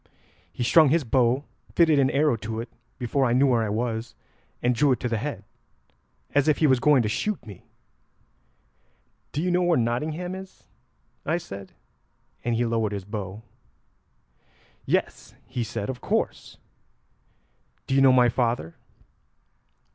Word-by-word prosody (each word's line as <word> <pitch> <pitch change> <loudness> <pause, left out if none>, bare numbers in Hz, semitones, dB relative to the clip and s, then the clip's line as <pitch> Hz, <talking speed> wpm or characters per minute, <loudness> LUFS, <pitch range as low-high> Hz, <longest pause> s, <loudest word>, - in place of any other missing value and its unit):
He - - -4
strung 155 +4 +6
his 160 +2 +2
bow, 125 +2 +2 0.3
fitted 160 -4 +5
an 135 -1 +3
arrow 145 -2 +2
to 110 +1 -5
it 115 +1 -6 0.3
before 130 +2 0
I 120 -2 +2
knew 130 +3 +4
where 120 -4 +3
I 110 - -1
was, 115 +1 -3 0.5
and 125 +1 +3
drew 140 +3 +3
it 125 - +1
to 125 - -1
the 115 -2 -1
head 145 +5 -5 0.9
as 145 +1 +3
if 155 - +3
he 160 - +2
was 130 -4 +4
going 140 -2 +4
to - - -1
shoot 180 - -2
me. 100 -5 -12 1.6
'Do 150 - -2
you 180 - +1
know 180 +1 +2
where 175 -1 +3
Nottingham 150 +10 -1
is?' 190 0 -10 0.6
I 160 +3 0
said, 95 - -9 0.7
and 120 -1 0
he 120 +1 +1
lowered 115 -2 0
his 100 -2 -5
bow. 105 0 -6 1.4
'Yes,' - - -1
he 125 +1 -3
said, 100 -2 -4
'of 130 -2 -5
course. - - -2 1.3
Do - - -3
you 135 - +4
know 135 -1 +7
my 125 -1 +5
father?' 115 -8 -1
125 Hz, 155 wpm, -25 LUFS, 115-150 Hz, 1.6 s, know